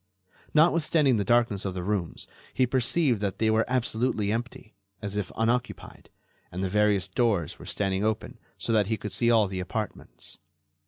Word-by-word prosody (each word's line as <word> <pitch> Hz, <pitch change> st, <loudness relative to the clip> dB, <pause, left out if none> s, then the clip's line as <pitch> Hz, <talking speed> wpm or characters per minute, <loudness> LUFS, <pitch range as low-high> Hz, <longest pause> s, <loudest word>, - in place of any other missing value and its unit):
Notwithstanding 155 Hz, -4 st, +4 dB
the 100 Hz, -, +1 dB
darkness 115 Hz, -2 st, +2 dB
of 95 Hz, -2 st, -3 dB
the 90 Hz, -, -3 dB
rooms, 95 Hz, -4 st, -2 dB, 0.3 s
he 130 Hz, -, +4 dB
perceived 130 Hz, -1 st, +1 dB
that 100 Hz, -2 st, -2 dB
they 110 Hz, -1 st, +2 dB
were 110 Hz, +1 st, +3 dB
absolutely 115 Hz, -4 st, 0 dB
empty, 115 Hz, -1 st, -5 dB, 0.3 s
as 100 Hz, +1 st, -5 dB
if 105 Hz, -3 st, -2 dB
unoccupied, 120 Hz, +2 st, -2 dB, 0.4 s
and 95 Hz, +2 st, -4 dB
the 95 Hz, -, 0 dB
various 105 Hz, -1 st, +2 dB
doors 100 Hz, -5 st, 0 dB
were -, -, -11 dB
standing 95 Hz, -1 st, -1 dB
open 110 Hz, 0 st, -2 dB, 0.2 s
so 115 Hz, -, -2 dB
that 105 Hz, -3 st, +3 dB
he 110 Hz, +1 st, 0 dB
could 105 Hz, -, -6 dB
see 115 Hz, +5 st, +1 dB
all 115 Hz, -3 st, +5 dB
the 95 Hz, -1 st, -4 dB
apartments. 100 Hz, +3 st, -6 dB
110 Hz, 170 wpm, -27 LUFS, 100-120 Hz, 0.4 s, all